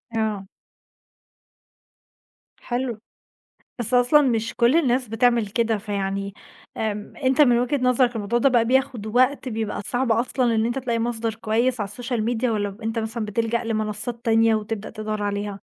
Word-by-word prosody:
آه. 210 Hz, -3 st, -2 dB, 2.1 s
حلو، 245 Hz, -2 st, -3 dB, 0.8 s
بس 240 Hz, +1 st, -2 dB
أصلًا 245 Hz, +5 st, +5 dB
مش 230 Hz, -5 st, 0 dB
كُلّ 240 Hz, +4 st, +3 dB
الناس 260 Hz, -6 st, +2 dB
بتعمل 230 Hz, 0 st, +2 dB
كده 225 Hz, +1 st, 0 dB
فيعني، 200 Hz, -1 st, -3 dB, 0.4 s
آمم، 210 Hz, -1 st, -3 dB
أنت 260 Hz, +2 st, +3 dB
من 245 Hz, -4 st, +5 dB
وجهة 250 Hz, +4 st, 0 dB
نظرك 250 Hz, -1 st, +3 dB
الموضوع 225 Hz, +2 st, 0 dB
ده 275 Hz, +3 st, +4 dB
بقى 240 Hz, -2 st, +3 dB
بياخد 260 Hz, -3 st, 0 dB
وقت 255 Hz, +3 st, +2 dB
بيبقى 220 Hz, -2 st, -3 dB
صعب 245 Hz, +1 st, 0 dB
أصلًا 235 Hz, +1 st, +1 dB
إن 220 Hz, -, +2 dB
أنت 240 Hz, +3 st, -1 dB
تلاقي 235 Hz, -3 st, -1 dB
مصدر 230 Hz, -1 st, -2 dB
كويّس 230 Hz, +3 st, 0 dB
على 200 Hz, -, -3 dB
الSocial 235 Hz, +2 st, -3 dB
Media 240 Hz, +1 st, -1 dB
والَّا 205 Hz, -4 st, -1 dB
أنت 225 Hz, +1 st, -1 dB
مثلًا 220 Hz, 0 st, -3 dB
بتلجأ 230 Hz, +3 st, -1 dB
لمنصّات 220 Hz, +1 st, -3 dB
تانية 225 Hz, -1 st, +4 dB
وتبدأ 215 Hz, 0 st, -4 dB
تدوّر 215 Hz, -1 st, -4 dB
عليها؟ 205 Hz, 0 st, -3 dB
230 Hz, 150 wpm, -23 LUFS, 215-245 Hz, 2.1 s, أصلًا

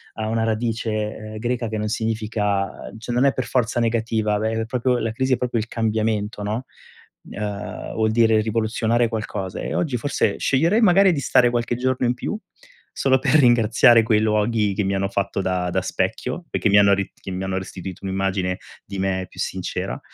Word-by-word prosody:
ha 110 Hz, -1 st, -3 dB
una 115 Hz, 0 st, 0 dB
radice, 115 Hz, 0 st, -1 dB, 0.2 s
ehm, 110 Hz, 0 st, -8 dB
greca, 120 Hz, 0 st, -2 dB
che 110 Hz, -, -3 dB
non 105 Hz, -, -2 dB
significa 105 Hz, -3 st, -1 dB, 0.3 s
cioè 115 Hz, +2 st, -5 dB
non 125 Hz, -, +2 dB
è 140 Hz, -, +5 dB
per 130 Hz, -, -2 dB
forza 120 Hz, -1 st, 0 dB
negativa, 110 Hz, -2 st, 0 dB
ve 110 Hz, +1 st, 0 dB
è -, -, -5 dB
propri 125 Hz, +1 st, 0 dB
la 115 Hz, -, -1 dB
crisi 130 Hz, +1 st, +1 dB
è -, -, -8 dB
proprio 120 Hz, -2 st, -1 dB
il 110 Hz, -, -6 dB
cambiamento, 110 Hz, -2 st, -1 dB
no? 110 Hz, +5 st, -3 dB, 0.6 s
Uhm, 105 Hz, -1 st, -5 dB
vuol 110 Hz, 0 st, +1 dB
dire 110 Hz, 0 st, +4 dB
rivoluzionare 115 Hz, +2 st, +1 dB
qualcosa 105 Hz, -4 st, -4 dB
e -, -, -4 dB
oggi, 140 Hz, -8 st, 0 dB
forse 145 Hz, +5 st, 0 dB
sceglierei 170 Hz, -, +2 dB
magari 195 Hz, -2 st, +5 dB
di 150 Hz, -, -1 dB
stare 125 Hz, -2 st, +4 dB
qualche 120 Hz, 0 st, -1 dB
giorno 130 Hz, 0 st, 0 dB
in 120 Hz, -, +1 dB
più, 170 Hz, -, -4 dB, 0.5 s
solo 130 Hz, -1 st, +2 dB
per -, -, +1 dB
ringraziare 120 Hz, -3 st, +5 dB
quei 110 Hz, -1 st, +2 dB
luoghi, 105 Hz, -1 st, +1 dB
che 105 Hz, -, 0 dB
mi 95 Hz, -, 0 dB
hanno 100 Hz, 0 st, 0 dB
fatto 100 Hz, 0 st, -2 dB
da 90 Hz, -1 st, -1 dB
da -, -, 0 dB
specchio, -, -, -2 dB
e -, -, -1 dB
che -, -, +1 dB
mi 100 Hz, -, +6 dB
hanno 100 Hz, -1 st, +6 dB
ri 100 Hz, 0 st, -3 dB
che 95 Hz, -, -9 dB
mi 95 Hz, +1 st, -3 dB
hanno 95 Hz, 0 st, -2 dB
restituito 95 Hz, 0 st, -8 dB
un'immagine 95 Hz, -1 st, -1 dB, 0.3 s
di 100 Hz, -1 st, -7 dB
me 95 Hz, -1 st, -1 dB
più -, -, -17 dB
sincera -, -, -3 dB
110 Hz, 195 wpm, -22 LUFS, 105-120 Hz, 0.6 s, mi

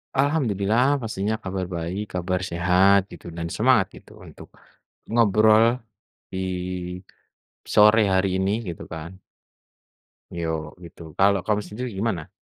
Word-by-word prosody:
Alhamdulillah 130 Hz, -2 st, +1 dB
pastinya 110 Hz, -1 st, -2 dB
kabar 95 Hz, -1 st, -3 dB
baik, 90 Hz, +3 st, -5 dB
kabar 90 Hz, +1 st, -1 dB
sehat 90 Hz, +2 st, +3 dB
gitu -, -, -11 dB
dan 85 Hz, 0 st, -5 dB
semangat -, -, +3 dB
gitu -, -, -20 dB
untuk -, -, -13 dB, 0.6 s
ngobrol 110 Hz, +2 st, +4 dB, 0.5 s
di 95 Hz, -, -5 dB, 1.3 s
sore 105 Hz, +1 st, +5 dB
hari 95 Hz, +1 st, +2 dB
ini 95 Hz, +2 st, +1 dB
gitu 85 Hz, -2 st, -6 dB
kan. 80 Hz, +3 st, -7 dB, 1.2 s
Yok 80 Hz, -2 st, -2 dB, 0.2 s
gitu, 85 Hz, 0 st, -13 dB, 0.2 s
kalau 100 Hz, 0 st, +4 dB
kamu 105 Hz, -1 st, +1 dB
sendiri 120 Hz, +7 st, -5 dB
gimana? 95 Hz, -7 st, -2 dB
100 Hz, 115 wpm, -24 LUFS, 90-110 Hz, 1.3 s, sore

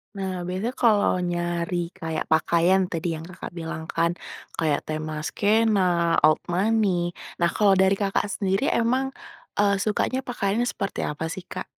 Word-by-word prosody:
Nah, 190 Hz, -2 st, -3 dB
biasanya 200 Hz, +8 st, -2 dB
kalo 215 Hz, -4 st, +5 dB, 0.2 s
nyari 175 Hz, 0 st, -2 dB, 0.2 s
kayak 160 Hz, -1 st, -3 dB
pakaian 170 Hz, +4 st, +3 dB
tadi 165 Hz, 0 st, -2 dB
yang 160 Hz, -, -7 dB
Kakak, 180 Hz, +1 st, -8 dB
bilang 160 Hz, -1 st, -5 dB
kan. 170 Hz, 0 st, +1 dB, 0.5 s
Kayak 155 Hz, -3 st, +2 dB
tema 155 Hz, 0 st, -4 dB
skena, 215 Hz, 0 st, +2 dB, 0.5 s
old 155 Hz, -, +2 dB
money. 185 Hz, -3 st, +1 dB, 0.2 s
Nah, 170 Hz, -, +4 dB
kalau 205 Hz, -2 st, +5 dB
dari 190 Hz, +1 st, +4 dB
Kakak 200 Hz, 0 st, 0 dB
sendiri 195 Hz, +6 st, 0 dB
emang, 255 Hz, +3 st, +1 dB, 0.5 s
eee, 200 Hz, -1 st, +3 dB
sukanya 215 Hz, +5 st, 0 dB
pakaiannya 240 Hz, -2 st, -1 dB
seperti 195 Hz, -4 st, -3 dB
apa 150 Hz, +2 st, -3 dB
sih, 185 Hz, 0 st, -7 dB
Kak? 185 Hz, -, -5 dB
190 Hz, 150 wpm, -25 LUFS, 170-205 Hz, 0.5 s, kalo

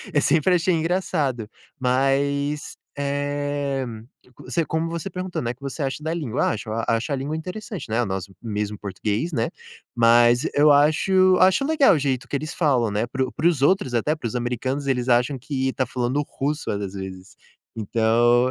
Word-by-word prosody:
eu 145 Hz, -, +4 dB
sempre 165 Hz, +5 st, +3 dB
achei 175 Hz, +1 st, +2 dB
engraçado, 160 Hz, -, -1 dB, 0.3 s
mas, 140 Hz, +3 st, 0 dB, 0.2 s
eh, 145 Hz, -1 st, -2 dB, 0.5 s
co -, -, -15 dB
você 165 Hz, -2 st, -1 dB
como 160 Hz, +2 st, -1 dB
você 170 Hz, +3 st, -4 dB
perguntou, 185 Hz, -1 st, -4 dB
né: 120 Hz, 0 st, -2 dB
"O -, -, -9 dB
que 130 Hz, -, -44 dB
você 140 Hz, +2 st, -4 dB
acha 135 Hz, +2 st, -3 dB
da 160 Hz, +1 st, -2 dB
língua". 150 Hz, -10 st, -1 dB
Ah, -, -, +2 dB
acho 110 Hz, 0 st, -6 dB, 0.2 s
acho 115 Hz, +5 st, 0 dB
a -, -, +2 dB
língua 140 Hz, +4 st, -3 dB
interessante, 185 Hz, -, -6 dB
né, 115 Hz, +3 st, +1 dB
o -, -, -2 dB
nosso 95 Hz, 0 st, -4 dB
mesmo 105 Hz, -2 st, -3 dB
português 105 Hz, -, -3 dB
né, 115 Hz, -5 st, 0 dB, 0.4 s
mas 120 Hz, +3 st, +4 dB
eu 150 Hz, +1 st, +6 dB
acho 185 Hz, +6 st, +4 dB
acho 190 Hz, +9 st, +4 dB
legal 300 Hz, -, +4 dB
o -, -, 0 dB
jeito 135 Hz, -3 st, -1 dB
que -, -, -2 dB
eles 155 Hz, +2 st, -6 dB
falam, 130 Hz, -9 st, +2 dB
né, 105 Hz, +2 st, -1 dB
para 130 Hz, +2 st, -1 dB
o -, -, -7 dB
para 165 Hz, -, +1 dB
os 155 Hz, -6 st, -2 dB
outros 140 Hz, -4 st, +2 dB
até, 135 Hz, +6 st, +1 dB
para 140 Hz, -7 st, -5 dB
os 115 Hz, -, -6 dB
americanos, 125 Hz, +3 st, -2 dB
eles 125 Hz, -2 st, 0 dB
acham 125 Hz, +3 st, +2 dB
que 130 Hz, +1 st, -2 dB
está 130 Hz, 0 st, -1 dB
falando 125 Hz, +3 st, -1 dB, 0.2 s
russo 150 Hz, +3 st, -1 dB
várias 100 Hz, -2 st, -4 dB
vezes, 95 Hz, -1 st, -8 dB, 0.4 s
então 115 Hz, +3 st, +3 dB
135 Hz, 190 wpm, -23 LUFS, 120-155 Hz, 0.5 s, eu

